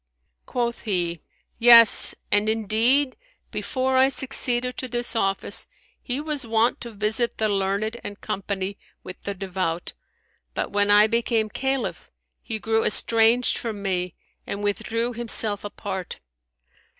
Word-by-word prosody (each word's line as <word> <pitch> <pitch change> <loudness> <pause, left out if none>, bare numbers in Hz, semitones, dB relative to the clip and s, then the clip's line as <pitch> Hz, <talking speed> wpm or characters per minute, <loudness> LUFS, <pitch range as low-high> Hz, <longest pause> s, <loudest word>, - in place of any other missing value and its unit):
Quoth 235 -1 -2
he, 175 -6 -2 0.4
Yes, 230 -2 +7 0.2
and 210 +1 +2
indeed, 225 +6 +1 0.4
before 260 -1 -1
I 265 +1 +5
succeeded 250 -2 +1
to 260 - -4
this 240 0 -3
office, 195 -3 0 0.3
he 255 +1 -4
was 300 -2 -2
wont 230 +1 +1
to 235 - -7
visit 215 +3 -1
the 220 - +1
learned 200 +3 -1
and 205 0 -7
company 195 0 -4 0.2
with 185 - -10
the 200 - -5
devout; 185 -3 -4 0.6
but, - - -3
when 205 0 +1
I 205 +1 +7
became 230 -1 0
Caliph, 265 -1 -3 0.3
he 225 - -4
grew 225 +1 0
estranged 230 +3 +4
from 215 -4 -6
me 180 -3 -2 0.3
and 200 +1 -5
withdrew 230 +4 -1
himself 225 -3 0
apart. 195 -3 -6
220 Hz, 130 wpm, -23 LUFS, 200-240 Hz, 0.6 s, Yes